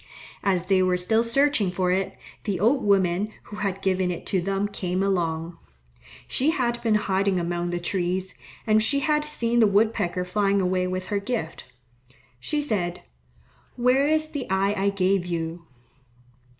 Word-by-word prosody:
As 185 -3 +1
they 190 0 +3
were 185 -1 +2
still 220 +5 +2
searching 235 -3 +2
for 180 0 0
it, 190 +1 -1 0.3
the 195 -4 -1
old 245 +7 +2
woman 195 0 +2
who 210 - -10
had 195 -2 -3
given 185 -1 +1
it 175 - -5
to 190 - 0
them 195 +2 -1
came 185 -2 -2
along. 170 -3 -1 0.7
She 275 +4 +2
had 240 -6 0
been 225 -2 +2
hiding 195 -2 +1
among 175 0 -2
the 175 0 -2
trees, 180 +1 -1 0.3
and 215 -1 +4
she 280 +6 +1
had 300 +1 +1
seen 240 -6 0
the 220 - +6
wood 215 +3 +3
pecker 180 +1 -2
flying 200 +1 +1
away 185 -1 0
with 185 0 -3
her 200 - +2
gift. 200 -7 -4 0.7
She 295 - -1
said, 185 -10 -2 0.7
"Where 250 +3 +3
is 310 0 +1
the 285 -5 -5
eye 195 +1 +1
I 200 0 +1
gave 195 -1 +1
you?" 170 0 -4
195 Hz, 165 wpm, -25 LUFS, 180-225 Hz, 0.7 s, the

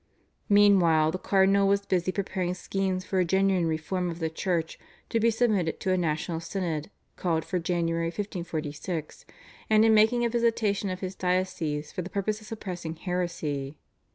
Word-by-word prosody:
Meanwhile 185 -7 +5
the 185 - -4
cardinal 195 +1 +3
was 200 0 +2
busy 185 -1 +1
preparing 185 -2 -2
schemes 190 0 -2
for 190 - 0
a - - +4
genuine 190 -1 +2
reform 175 +3 -2
of 165 - -5
the 160 -2 -2
Church 165 -1 -2 0.3
to 230 - +1
be 230 +1 +4
submitted 215 -8 +1
to 190 - 0
a - - +3
national 165 0 -1
synod 165 -2 -3 0.3
called 165 -3 0
for 180 - -1
January 165 -1 0
1546, 165 -3 -5 0.4
and 215 0 +5
in 225 - +5
making 220 +3 +4
a - - +1
visitation 225 -4 +1
of 185 0 -5
his 185 -1 -4
diocese 180 -5 -1
for - - -4
the 180 - -6
purpose 210 +2 -2
of 215 - -13
suppressing 180 -7 -5
heresy. 160 -6 -3
185 Hz, 165 wpm, -27 LUFS, 165-200 Hz, 0.4 s, Meanwhile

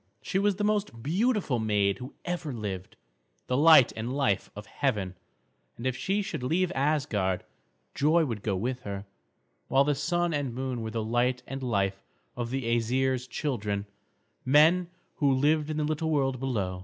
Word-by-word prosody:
She 190 - 0
was 205 0 +2
the 205 - -3
most 205 - -1
beautiful 190 - +1
maid 105 -2 +1
who 130 +2 -8
ever 175 -4 -3
lived, 100 -6 -5 0.5
the 125 - -1
light 155 -2 +7
and 115 +2 -3
life 130 -8 0
of 105 +1 -8
heaven, 105 -11 -1 0.6
and 120 - -7
if 130 -1 0
she 195 +10 0
should 155 -7 -4
leave 170 +8 +1
Asgard, 125 -11 0 0.5
joy 155 +4 +3
would 115 -7 -4
go 100 -2 -1
with 125 +7 -2
her; 100 -3 -6 0.6
while 135 +1 +4
the 145 +1 +2
Sun 170 +5 0
and 140 -5 -2
Moon 130 -2 -3
were 110 - -3
the 110 0 -2
light 120 +3 0
and 135 0 -6
life 100 -5 0 0.3
of 120 -1 -3
the 135 +1 -2
Æsir's 125 +2 0
children, 105 -7 -2 0.6
men, 160 +6 +5 0.3
who 140 -2 +3
lived 150 +3 +2
in 155 - -2
the 155 - 0
little 155 +1 -1
world 135 -4 +1
below. 100 -9 -2
130 Hz, 170 wpm, -28 LUFS, 115-155 Hz, 0.6 s, light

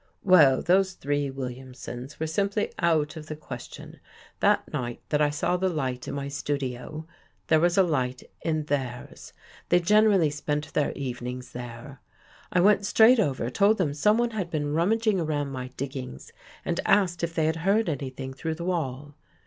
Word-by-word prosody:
" - - -41
Well, 140 -7 +6
those 190 +2 +3
three 145 -2 -1
Williamsons 130 0 -7
were 160 - -1
simply 200 +6 -1
out 160 -3 +1
of 155 -1 -9
the 155 - -5
question. 130 -5 -10 0.4
That - - +2
night 120 -1 -3
that 150 0 +1
I 150 - +4
saw 150 +4 0
the 190 +1 +1
light 130 -7 -3
in - - -4
my 140 0 -3
studio, 140 +1 -4 0.4
there 160 - +5
was 175 +2 +2
a 195 - +7
light 130 -7 -1 0.2
in 155 -1 -1
theirs 130 -4 -4 0.2
— - - -24
they 175 - +5
gener 210 +5 +4
ally 165 -5 +3
spent 150 0 -3
their 150 - +1
evenings 125 -1 -5
there. 125 +2 -9 0.5
I 180 - +3
went 205 +1 +4
straight 225 +4 +6
over, 135 - 0
told 205 - +3
them 155 -7 0
someone 215 +10 +2
had 195 -6 -3
been 145 -3 -2
rummaging 210 +5 +2
around 145 -4 -1
my 130 -1 -5
diggings 130 - -6 0.3
and - - -1
asked 175 -4 +2
if 170 0 -2
they 160 - +2
had 160 +1 0
heard 195 +6 +2
any 140 -4 -2
thing 130 0 -7
through 160 +4 -4
the 170 +1 -6
wall. 145 -5 -3
150 Hz, 180 wpm, -26 LUFS, 135-175 Hz, 0.5 s, a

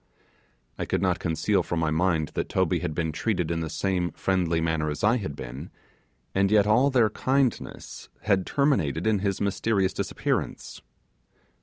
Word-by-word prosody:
I - - -1
could - - -1
not - - +1
conceal 80 -1 +1
from 85 - -2
my 80 -1 0
mind 80 -2 +1
that - - -3
Toby - - +1
had 75 - -3
been 80 -1 -1
treated 90 0 -1
in 85 - -1
the 80 -1 -3
same 90 +1 -1
friendly 90 -3 0
manner 80 -1 0
as 75 - -5
I 110 +4 +4
had 95 - -5
been, 65 -1 -8 0.6
and 95 0 +2
yet 105 -1 +4
all 120 +7 +4
their 120 -5 +3
kindness 130 -2 -1 0.4
terminated 95 - +1
with 110 -3 +2
his 100 -2 -1
mysterious 100 -1 0
disappearance. - - -3
95 Hz, 160 wpm, -26 LUFS, 80-105 Hz, 0.6 s, I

